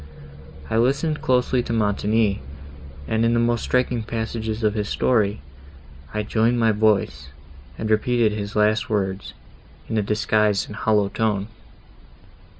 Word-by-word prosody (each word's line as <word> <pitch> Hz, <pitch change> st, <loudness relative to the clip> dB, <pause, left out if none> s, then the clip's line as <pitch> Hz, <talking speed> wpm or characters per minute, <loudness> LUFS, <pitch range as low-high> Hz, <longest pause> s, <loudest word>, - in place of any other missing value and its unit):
I 110 Hz, -, -1 dB
listened 140 Hz, +6 st, +1 dB
closely 125 Hz, 0 st, +2 dB
to 115 Hz, -, -4 dB
Montoni, 105 Hz, -2 st, +1 dB, 0.7 s
and, 110 Hz, +1 st, 0 dB
in 115 Hz, +1 st, +2 dB
the -, -, +2 dB
most 120 Hz, -1 st, +1 dB
striking 125 Hz, -2 st, 0 dB
passages 110 Hz, 0 st, -4 dB
of 105 Hz, -1 st, +2 dB
his 105 Hz, -1 st, -3 dB
story, 105 Hz, -, +1 dB, 0.7 s
I 105 Hz, -, -2 dB
joined 115 Hz, +3 st, +1 dB
my 115 Hz, -1 st, +4 dB
voice, 100 Hz, -11 st, +1 dB, 0.5 s
and 110 Hz, -, -3 dB
repeated 110 Hz, +1 st, +2 dB
his 105 Hz, 0 st, -5 dB
last 105 Hz, +1 st, +2 dB
words, 95 Hz, -2 st, -2 dB, 0.5 s
in 110 Hz, -, -1 dB
a -, -, +2 dB
disguised 105 Hz, 0 st, +1 dB
and 105 Hz, -, -9 dB
hollow 105 Hz, -2 st, +1 dB
tone." 105 Hz, -2 st, -1 dB
110 Hz, 140 wpm, -22 LUFS, 105-115 Hz, 0.7 s, my